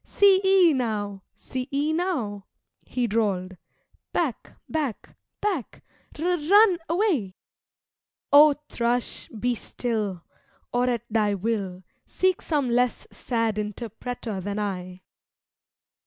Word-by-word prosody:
See 395 -2 +4
ee 380 -4 +6
now! 210 -6 -2
see 255 +1 -5
ee 290 +3 +1
now!' 265 - -2 0.4
(he 250 -1 -1
drawl'd) 200 -5 0 0.6
'Back! - - -2
back! 290 -8 -3 0.3
back! 380 - -2 0.3
R 315 - -3
r 360 - +3
r 355 - +2
run 375 +4 +5
away!' 330 - +1 1.0
O 295 +1 +9
Thrush, 240 +1 -1
be 240 +2 -1
still! 215 -6 -3 0.5
Or 245 +1 +2
at 235 -2 -1
thy 210 -2 +2
will, 195 -3 -2 0.2
Seek 370 -1 +1
some 290 -5 0
less 245 0 +1
sad 230 -3 -1
interpreter 220 0 -5
than 200 +2 -4
I. 185 -3 -4
240 Hz, 115 wpm, -25 LUFS, 205-305 Hz, 1.0 s, O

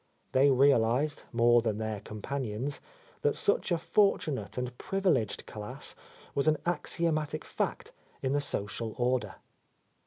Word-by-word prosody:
They 135 +2 +5
realized, 135 +1 +3
more 120 0 +5
than 110 -3 -1
their 110 -1 -3
companions, 125 +4 -4 0.4
that 145 - +1
such 200 - +1
a 170 - +4
fortunate 160 - +1
and 125 0 -3
privileged 185 - 0
class 105 -1 -6 0.4
was 140 +2 +1
an 155 0 +4
axiomatic 155 -2 -1
fact - - -3 0.3
in 130 0 +1
the 145 - +2
social 110 -2 -3
order. 125 0 0
130 Hz, 125 wpm, -30 LUFS, 110-155 Hz, 0.4 s, They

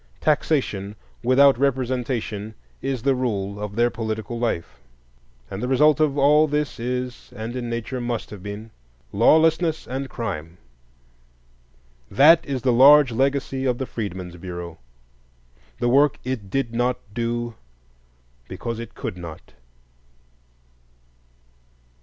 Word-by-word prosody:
Taxation 130 -10 0 0.3
without 130 +1 +5
representation 125 -5 -1 0.3
is 135 -4 -3
the 140 - +3
rule 105 -6 -2
of 105 -1 -5
their 120 +1 +2
political 110 +1 -4
life. 85 - -2 0.7
And 95 - -5
the 125 - -2
result 150 +3 +4
of 150 -2 +2
all 150 +2 +5
this 150 -3 -2
is, 125 +1 -4
and 115 +3 -5
in 120 -2 -4
nature 120 +2 -4
must 120 -1 -3
have 105 -3 -9
been, 105 +3 -7 0.4
lawlessness 160 - +3
and 130 +2 -4
crime. 85 -8 -5 1.5
That 160 +5 +6
is 135 -4 -4
the 125 - +3
large 140 +2 +7
legacy 135 +1 0
of 125 -2 +1
the 130 - -3
Freedmen's 95 -7 -6
Bureau, 85 -2 -7 1.0
the 120 - 0
work 140 +3 +4
it 120 -6 -4
did 125 +1 -1
not 120 +1 +1 0.2
do 120 +1 -2 0.9
because 115 -1 -5
it 115 - -8
could 90 - -5
not. 85 -2 -10
120 Hz, 125 wpm, -23 LUFS, 110-135 Hz, 1.5 s, large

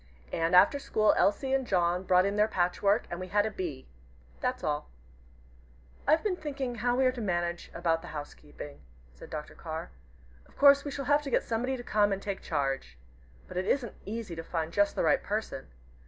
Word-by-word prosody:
And 165 +2 +2
after 235 +10 +6
school, 215 -6 +3
Elsie 265 +7 +2
and 270 0 +2
John 175 -2 +2
brought 185 0 +4
in 200 +1 0
their 210 +1 +4
patchwork, 200 +3 +1
and 175 - -4
we 185 - -5
had 205 +2 +2
a 220 - -2
'Bee.' 165 -10 -5 0.5
That's 255 0 -2
all." 150 -1 -2 1.2
"I've 310 +3 +4
been 410 -4 +1
thinking 275 -6 -4
how 245 +1 0
we 260 +1 +3
are 255 - +4
to 250 -2 -6
manage 175 -3 -2
about 165 -1 0
the 175 - -10
housekeeping," 145 -1 -9 0.3
said 60 - -12
Dr. 150 -1 -6
Carr. 160 0 -6 0.6
"Of - - -24
course 280 0 +7
we 290 - -4
shall 275 -1 -4
have 290 +2 +4
to 290 - -5
get - - +2
somebody 250 +3 -1
to 245 - -7
come 205 -3 +2
and 195 - 0
take 195 -1 -4
charge. 135 - -2 0.5
But - - -7
it 185 - -1
isn't 250 -5 0
easy 210 -4 -5
to 165 - -6
find 165 -1 -3
just 205 0 +2
the - - 0
right 155 -3 +3
person. 210 - -3
200 Hz, 200 wpm, -30 LUFS, 170-250 Hz, 1.2 s, course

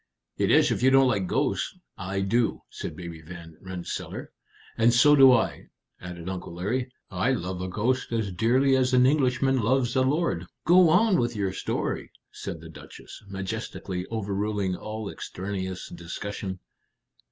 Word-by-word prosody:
"It - - +1
is, - - +5
if - - -1
you 130 - +5
don't 135 0 +6
like 100 -5 0
ghosts. - - -1 0.2
I 95 +1 -3
do," 115 +4 +1
said - - -6
Baby 85 -3 -8
Van 85 0 -11
Rensselaer. 95 -2 -6 0.4
"And 115 +1 +4
so 145 +4 +7
do 135 -2 +8
I," 125 -3 +1 0.3
added 90 -1 -8
Uncle 90 -2 -5
Larry. 125 +8 -2 0.2
"I 100 +8 +1
love 90 -5 -3
a 95 - -3
ghost 120 +8 -1
as 110 -4 -1
dearly 125 +8 +3
as 130 0 +2
an 125 0 +6
Englishman 135 -2 +2
loves 120 +2 +1
a 130 - +4
lord." 130 - 0 0.2
"Go 175 +1 +6
on 190 +3 +4
with 120 -1 0
your 100 -2 -1
story," - - -3 0.2
said 80 - -7
the 80 - -10
Duchess, 80 - -12
majestically 95 -2 -5
overruling 100 -3 -2
all 110 +2 -6
extraneous 95 -1 -5
discussion. 95 +2 -6
105 Hz, 155 wpm, -26 LUFS, 95-130 Hz, 0.4 s, do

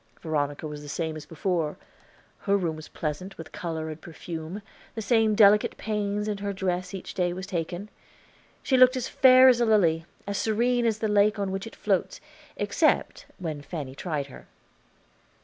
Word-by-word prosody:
Veronica 145 -2 -2
was 150 -1 -6
the 145 - -9
same 160 +1 -3
as 155 - -9
before; 165 -2 -1 0.6
her 200 -1 +2
room 170 -5 -1
was 155 0 -10
pleasant 175 +6 -5
with 165 - -9
color 160 -2 -4
and 155 +1 -9
perfume, 165 +3 -7 0.3
the - - -4
same 220 0 +3
delicate 210 0 +5
pains 210 -1 -2
with 205 -2 -2
her 200 0 -2
dress 185 -1 -2
each 190 - -7
day 175 -1 0
was 185 +1 -6
taken. 175 +1 -4 0.8
She 260 - +2
looked 255 +1 +6
as 250 - -2
fair 260 0 +7
as 245 -2 +5
a - - +4
lily, 170 -7 +3 0.2
as 200 0 -2
serene 235 +2 +1
as 220 -2 +1
the 220 - -1
lake 210 +1 +3
on 200 -2 -2
which 195 +3 -4
it - - -11
floats, - - -1 0.4
except - - +1
when 160 -6 -5
Fanny 145 -3 -6
tried 150 -1 -3
her. 135 - -13
190 Hz, 180 wpm, -26 LUFS, 160-210 Hz, 0.8 s, fair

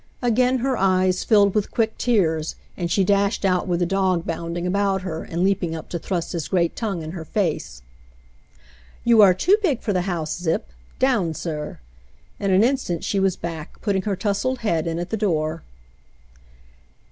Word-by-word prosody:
Again 250 +2 +3
her 265 -1 +1
eyes 185 -1 +2
filled 200 -3 +4
with 210 -2 0
quick 220 -1 0
tears, 165 -10 +1 0.2
and 170 -1 -3
she 195 - +2
dashed 200 +1 +1
out 185 -1 +1
with 175 -1 0
the - - +3
dog 185 -2 +1
bounding 170 +1 -3
about 195 0 +1
her 165 -4 -4
and 170 +2 -2
leaping 185 -4 +1
up 160 - -8
to 170 - -3
thrust 175 -1 -3
his 165 -4 -3
great 170 -3 +1
tongue 200 -8 -3
in 155 - -6
her 170 -2 -6
face. 155 - -2 1.2
"You 230 -2 +6
are 190 -3 +7
too 370 - +4
big 300 - +1
for 210 - -1
the 180 - +1
house. 160 -3 -2
Zip. 165 -2 -1 0.3
Down, 215 -12 +1
sir!" 150 -3 -5 0.6
In 200 - -1
an 190 +2 +5
instant 245 -9 0
she 200 - 0
was 190 -1 +2
back, 165 -3 -7
putting 200 -3 +1
her 200 0 -1
tousled 225 +6 -1
head 170 -8 0
in 165 0 -2
at 175 +1 -4
the 220 - 0
door. 165 -5 -1
185 Hz, 180 wpm, -23 LUFS, 170-205 Hz, 1.2 s, are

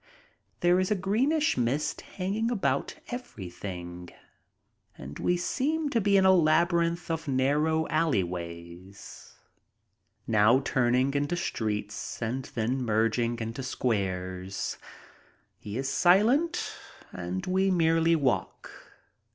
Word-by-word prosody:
There 175 +1 +4
is 185 - 0
a 210 - +2
greenish 260 - +1
mist 125 +5 -1
hang 185 +1 -4
ing 225 +2 0
about 235 -5 -1
everything 90 - -7 0.9
and 70 +2 -9
we 180 - +1
seem 290 - -1
to 230 - +2
be 200 0 +3
in 190 - +4
a 190 - +7
labyrinth 170 0 +2
of 165 0 -3
narrow 150 +4 +1
alleyways, 90 - -4 0.9
now 110 +3 +4
turning 130 0 +1
into 145 +4 0
streets 105 -9 -3
and 125 +3 -3
then 120 +3 -1
merging 115 +1 +1
into 115 +3 -5
squares. 95 -7 -3 0.8
He 105 +2 -6
is 135 +1 -2
silent 235 - +3 0.4
and 90 +1 -4
we 190 +1 +1
merely 165 -2 +3
walk. 140 -6 -1
135 Hz, 110 wpm, -28 LUFS, -, 0.9 s, a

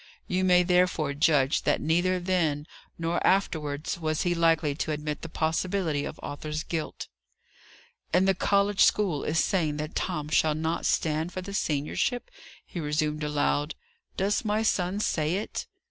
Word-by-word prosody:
You 185 0 0
may, 180 -1 +5
therefore, 180 -5 +2
judge 145 -2 +3
that - - +1
neither 175 +3 +1
then, 170 -5 0 0.3
nor 165 +1 -1
afterwards, 160 -3 0
was 155 -1 -1
he 175 -1 +1
likely 165 -3 +2
to 155 - -3
admit 150 0 -3
the 165 - -6
possibility 160 -1 -1
of - - -7
Arthur's 150 +2 -4
guilt. 165 -3 -4 1.0
"And 180 +3 +3
the 195 - +5
college 200 +1 +2
school 180 -9 +2
is 155 - -1
saying 160 -3 +1
that 155 +1 -4
Tom 150 -5 -2
shall 155 0 +3
not 160 +1 -1
stand 160 +2 0
for 185 - -5
the 200 +1 -7
seniorship!" 160 - -1 0.3
he 175 - -7
resumed 150 0 -1
aloud. 150 0 0 0.4
"Does 200 +2 +1
my 215 0 0
son 190 -2 0
say 160 -5 0
it?" 205 +3 -4
165 Hz, 155 wpm, -27 LUFS, 150-185 Hz, 1.0 s, may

